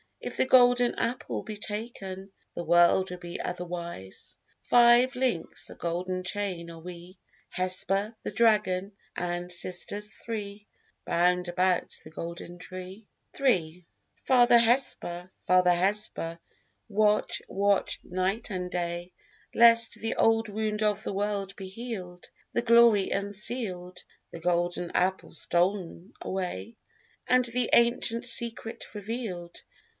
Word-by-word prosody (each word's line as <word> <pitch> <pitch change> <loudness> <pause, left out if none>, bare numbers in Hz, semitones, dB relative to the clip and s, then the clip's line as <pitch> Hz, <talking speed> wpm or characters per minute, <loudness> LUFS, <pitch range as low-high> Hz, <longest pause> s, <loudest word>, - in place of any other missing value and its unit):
If - - -6
the - - +3
golden 245 -1 +5
apple 235 +2 -2
be 215 -1 -7
taken 205 -3 -6 0.2
The 175 - -4
world 175 +3 +4
will 180 - -6
be 175 -1 -7
overwise. 170 - -6 0.3
Five 245 +2 +5
links, 250 -10 -2
a - - -10
golden 185 +2 -3
chain, 185 -3 -3
are 165 - -10
we, 175 +2 -10 0.3
Hesper, 195 +4 -1
the - - -4
dragon, 210 -4 +2 0.2
and 175 0 -3
sisters 185 +4 -2
three, 210 -2 -7 0.4
Bound 180 +1 +2
about 180 0 0
the - - -11
golden 170 +2 -7
tree. 185 +3 -9 0.3
III 180 -10 +1 0.4
Father 245 -2 +6
Hesper, 225 -7 +1
Father 180 -1 +5
Hesper, 180 -2 0 0.5
watch, 210 -1 +2
watch, 200 0 +1
night 190 +6 -2
and 180 -2 -3
day, 175 0 -3 0.4
Lest 230 -1 +6
the 225 - -2
old 225 0 +3
wound 215 0 -2
of 210 0 +1
the - - -3
world 200 -1 -2
be 190 -1 -8
healèd, 190 -6 -7 0.3
The 235 - 0
glory 235 -4 +5
unsealèd, 200 -3 -3 0.3
The 170 - -8
golden 175 0 -1
apple 185 +1 0
stol'n 175 +2 -1
away, 190 +4 -4 0.5
And 250 0 +4
the 240 0 0
ancient 235 0 +3
secret 230 -1 -2
revealèd. 205 -5 -5
195 Hz, 120 wpm, -28 LUFS, 180-225 Hz, 0.5 s, Father